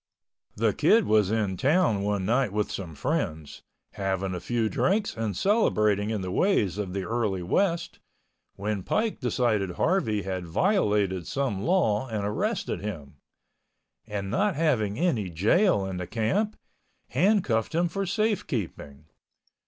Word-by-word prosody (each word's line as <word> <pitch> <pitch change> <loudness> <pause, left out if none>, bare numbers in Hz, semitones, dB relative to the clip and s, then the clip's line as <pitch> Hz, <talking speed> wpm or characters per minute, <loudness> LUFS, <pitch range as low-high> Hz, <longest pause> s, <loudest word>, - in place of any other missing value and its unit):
The - - +1
Kid 225 -2 +4
was 105 -3 +3
in 105 -4 0
town 130 - +2
one 100 -2 -1
night 120 +1 +1
with 105 0 -1
some 85 -5 -6
friends, 85 - -3 0.3
having 95 -1 -2
a 90 - -3
few 115 +5 -1
drinks 200 - 0
and 110 -4 -3
celebrating 105 - +2
in 110 -3 -2
the 90 -1 -4
ways 105 - +1
of 95 -3 -3
the 100 -1 -2
early 105 -4 -1
West, 170 - 0 0.6
when 105 0 -2
Pike 220 - -1
decided 115 -7 0
Harvey 110 - +1
had 95 -2 -4
violated 105 - +1
some 135 -9 -2
law 135 - +1
and 105 -4 -3
arrested 105 +1 -2
him, 80 -9 -7 0.9
and 100 -2 -4
not 200 -2 +1
having 125 -10 +1
any 135 - 0
jail 105 - +2
in 95 -1 -4
the 90 -1 -5
camp, 195 - 0 0.5
handcuffed 160 - +1
him 175 +1 +2
for 195 +3 -3
safekeeping. 150 - -2
105 Hz, 140 wpm, -27 LUFS, -, 0.9 s, Kid